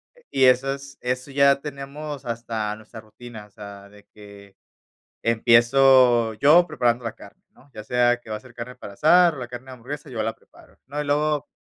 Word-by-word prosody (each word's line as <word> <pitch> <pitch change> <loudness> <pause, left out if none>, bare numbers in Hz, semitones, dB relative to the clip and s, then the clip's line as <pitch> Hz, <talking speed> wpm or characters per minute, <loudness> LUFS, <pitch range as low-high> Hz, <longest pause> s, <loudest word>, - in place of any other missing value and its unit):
eh, - - -24
y 135 -1 +3
esas 135 +2 +1
eso 125 +2 -3
ya 140 0 +3
tenemos 145 0 -8
hasta 115 -2 -4
nuestra 110 +1 -13
rutina, 110 0 -12
o - - -22
sea, 100 0 -11
de 105 0 -19
que 100 -1 -15 0.7
empiezo 120 0 +4
yo 155 +9 +5
preparando 120 -6 -1
la 115 - -3
carne, - - -16
¿no?, 140 +2 -24
ya 110 - -8
sea 120 +1 +1
que 110 - -15
va 110 - -3
a - - -9
ser 125 +1 -17
carne 125 +2 -8
para 100 - -10
asar 170 - +4
o - - -10
la 125 -2 -6
carne 125 +1 -9
de 130 - -11
hamburguesa, 140 +5 -9
yo 110 -3 -3
la 110 +1 -3
preparo, - - -22
¿no?, 145 +2 -5
y - - -3
luego, 150 0 0
125 Hz, 200 wpm, -23 LUFS, 110-140 Hz, 0.7 s, yo